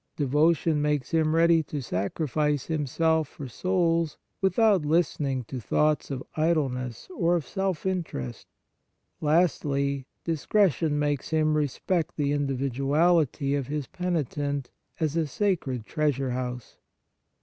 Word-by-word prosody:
Devotion 150 +2 +2
makes 150 -2 0
him 160 -1 +2
ready 165 0 +5
to 150 -1 -5
sacrifice 145 - -1
himself 160 +1 +1
for 140 -1 -8
souls, 170 +2 0 0.2
without 200 -2 +3
listening 145 -4 +1
to 130 +3 -6
thoughts 150 +6 +1
of 135 -2 -4
idleness 135 -7 -1
or 175 0 +2
of 165 -5 -1
self 190 +2 -2
interest. 165 - -3 0.7
Lastly, 140 -4 +1 0.2
discretion 165 - +1
makes 145 -2 -1
him 155 -1 +2
respect 155 +4 -1
the 145 -2 +1
individuality 140 +2 +1
of 140 -3 -1
his 150 -1 -3
penitent 145 -6 -2 0.3
as 155 -2 0
a 165 -2 +1
sacred 140 - -1
treasure 140 -3 0
house. 125 -1 -5
150 Hz, 115 wpm, -27 LUFS, 140-165 Hz, 0.7 s, ready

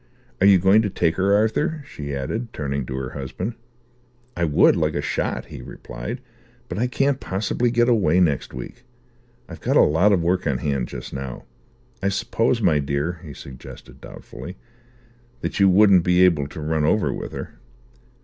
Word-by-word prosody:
Are 100 - +6
you 100 -1 +7
going 95 +4 +5
to 105 - -1
take 85 -3 0
her, 100 +2 +3
Arthur?" 145 - 0
she 70 -1 -6
added, 110 - -4
turning 70 -3 -3
to 65 - -4
her 65 -1 -4
husband. 80 - -5 0.8
"I 85 - 0
would, 75 -2 +4
like - - 0
a - - 0
shot," - - -2
he - - -10
replied, - - -7 0.5
"but - - -4
I 125 - +1
can't 135 +2 0
possibly 105 +5 -1
get 120 0 +2
away 95 -8 +3
next 75 -7 +1
week. 65 - -9 0.6
I've 85 - -10
got - - +2
a - - +8
lot 80 +8 +3
of 90 -4 +2
work 90 0 0
on 70 -3 +1
hand 70 -1 -1
just - - -8
now. 65 -2 -6 0.6
I 100 - +1
suppose, 115 +4 0
my 80 -6 +4
dear," 70 +5 -2
he 75 -5 -9
suggested 65 -1 -12
doubtfully, 90 +2 -10 0.8
"that - - -3
you 100 -1 +6
wouldn't 95 -2 +6
be 90 +1 +5
able 75 -6 +2
to 80 +2 -8
run 80 0 0
over 100 +7 +2
with - - -6
her?" - - -8
90 Hz, 180 wpm, -22 LUFS, 70-105 Hz, 0.8 s, a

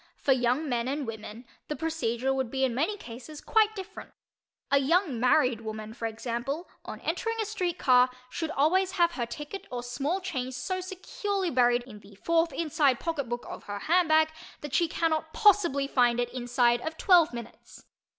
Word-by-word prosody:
For 275 - 0
young 255 +4 +2
men 240 -2 -1
and 280 +1 -2
women 225 +1 -8 0.2
the 300 - -3
procedure 270 -6 -1
would 265 -3 -1
be 265 +2 -1
in 260 -3 +2
many 325 - 0
cases 255 - -10
quite 435 -1 +2
different. 390 0 -8 0.6
A 280 - +5
young 295 - +1
married 250 -2 +3
woman, 215 0 -6
for 230 0 -3
example, 240 +8 -4 0.2
on - - -7
entering 455 0 -2
a 440 - 0
street 365 -5 -2
car, 250 -1 +5 0.2
should 320 +5 -4
always 360 +6 +2
have 345 -1 +3
her 240 -8 -3
ticket 295 +10 -7
or 245 -1 -4
small 275 +9 -2
"change" 260 -9 -4
so 370 +9 -3
securely 380 0 -3
buried 245 -1 +3
in 230 -4 -12
the 205 0 -17
fourth 330 - +1
inside 285 -3 +1
pocketbook 275 -8 -3
of - - -8
her 205 0 -5
handbag 315 - +3 0.3
that 295 -2 -7
she 340 - +3
cannot 315 -1 -1
possibly 350 -10 +4
find 245 -3 +2
it 245 0 -2
inside 240 -1 +2
of 320 +3 -5
twelve 350 -4 +5
minutes. 235 -1 -10
275 Hz, 180 wpm, -28 LUFS, 240-335 Hz, 0.6 s, A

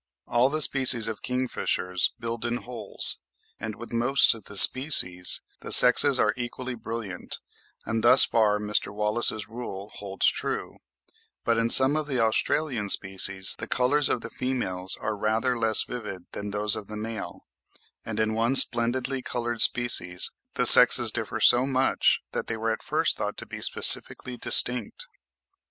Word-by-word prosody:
All 120 +2 -1
the 155 +2 -5
species 130 -5 +2
of 110 -2 -8
kingfishers 125 -7 -4
build 115 0 -7
in 120 0 -4
holes, 120 -2 -4 0.4
and 110 0 -8
with 120 - -13
most 125 +4 +2
of 115 - -15
the 100 - -7
species 95 - +5 0.2
the - - -9
sexes - - +7
are - - -1
equally 125 +1 -8
brilliant, 115 -5 -9 0.5
and 110 0 -5
thus 125 +3 +5
far 105 -2 -1
Mr. 105 -1 -3
Wallace's 105 0 -3
rule 105 -3 -11
holds 100 -1 -3
good; - - -7 0.7
but 115 -1 -2
in 115 0 -2
some 130 +4 +6
of 155 -1 -5
the 135 -4 -5
Australian 115 0 -3
species 95 -1 +2
the - - -9
colours 135 +3 -1
of 120 - -3
the 115 - -11
females 95 -8 -4
are 110 0 -6
rather 110 +4 -3
less 110 -2 0
vivid 105 -7 -10
than 105 0 -8
those 105 0 -2
of 105 -2 -10
the 105 - -10
male; 110 +1 -9 0.6
and 110 -1 -8
in 110 0 -3
one 115 +4 -2
splendidly 130 +2 +1
coloured 120 -2 -6
species, 90 -7 0 0.2
the - - -1
sexes - - +7
differ - - -7
so 125 +2 +2
much 135 -1 -1
that - - -7
they 110 - -6
were 110 +1 -4
at - - -10
first - - -3
thought - - -7
to - - -9
be - - -12
specifically 125 - +5
distinct. 120 -1 +1
115 Hz, 160 wpm, -23 LUFS, 105-125 Hz, 0.7 s, sexes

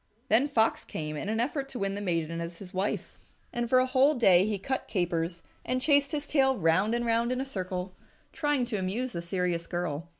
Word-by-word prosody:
Then 240 +6 +4
Fox 225 -6 +2
came 155 -1 -5
in 175 - -4
an 220 +1 0
effort 275 +3 -1
to 265 - -6
win 195 -2 -1
the 205 - -4
maiden 165 -3 -1
as 170 0 -6
his 190 0 -11
wife. 190 +2 -2 0.3
And 240 -1 -2
for 255 - +5
a 255 - +5
whole 265 +3 +4
day 195 -6 +5
he 210 -2 -1
cut 265 +7 -3
capers, 170 -2 -1 0.2
and 255 +1 -1
chased 285 +1 +3
his 295 -2 -3
tail 265 -3 +3
round 185 +7 +2
and 240 0 -1
round 230 +1 +1
in 255 - -1
a 265 - -2
circle, 185 -6 -4 0.4
trying 295 -4 +1
to 235 -3 -3
amuse 205 +7 -2
the 170 - -4
serious 175 -1 -2
girl. 170 -2 -3
210 Hz, 220 wpm, -29 LUFS, 175-255 Hz, 0.4 s, for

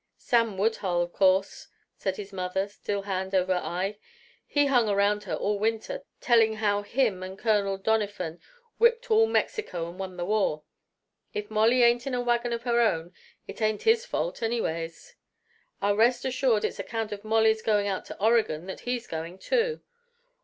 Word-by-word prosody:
"Sam 230 -4 +1
Woodhull, 190 -4 +1
of 175 - -8
course," 190 0 +2 0.3
said 190 -1 -2
the 205 -1 -7
mother, 185 +1 -1
still 200 0 -4
hand 190 -1 -3
over 185 0 +2
eye. 185 +3 -2 0.5
"He 290 -1 +2
hung 245 -6 +3
around 205 +1 +1
all 205 0 -1
winter, 225 - -1 0.2
telling 225 -4 +4
how 205 -1 +1
him 210 -2 0
and 185 +1 -7
Colonel 200 -3 +1
Doniphan 200 -5 -1 0.4
whipped 470 +1 +3
all 445 +1 +5
Mexico 305 - -1
and 175 +2 -10
won 185 -1 -6
the 175 - -2
war. 195 -7 0 0.7
If 210 +1 -4
Molly 225 +3 +4
ain't 240 +2 +3
in 260 - -1
a 245 - 0
wagon 240 0 0
of 235 0 -3
her 240 -1 +2
own, 175 -6 0 0.3
it - - -9
ain't 215 -1 0
his 455 +1 +4
fault, - - -3
anyways! 165 -8 -3 0.7
I'll 200 0 +3
rest 240 +3 +3
assured 255 -4 +1
it's - - -4
account 225 -2 -3
of 205 0 -6
Molly's 220 0 +3
going 210 -2 +1
out 195 -2 -2
to - - -9
Oregon 215 -7 +2
that 190 - -7
he's 245 -1 -3
going 165 +3 -6
too! 465 - 0
210 Hz, 170 wpm, -27 LUFS, 190-235 Hz, 0.7 s, all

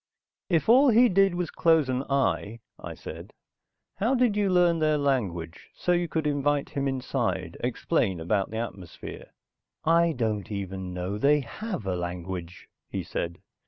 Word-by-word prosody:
"If 165 -4 +2
all 260 +5 +7
he 240 +1 +6
did 195 -1 +3
was 175 -1 -2
close 160 -4 +3
an 130 0 0
eye," 115 -5 0 0.2
I - - -7
said. - - -9 0.6
"How 225 +7 +2
did 245 -4 +3
you 205 -2 +2
learn 175 -2 +4
their 155 -1 +2
language, 100 - -2
so 180 - -1
you 175 0 +2
could 160 -1 -2
invite 145 -1 +1
him 140 -1 -1
inside, 130 -2 -2
explain 95 -3 0
about 95 +4 0
the 110 - -5
atmosphere?" 100 -7 -7 0.6
"I 165 +1 +4
don't 110 -6 -2
even 95 -2 -4
know 90 +3 -3
they 145 +4 +4
have 185 - -6
a 95 -1 -1
language," 90 0 -5 0.2
he - - -3
said. 85 0 -4
140 Hz, 160 wpm, -27 LUFS, -, 0.6 s, all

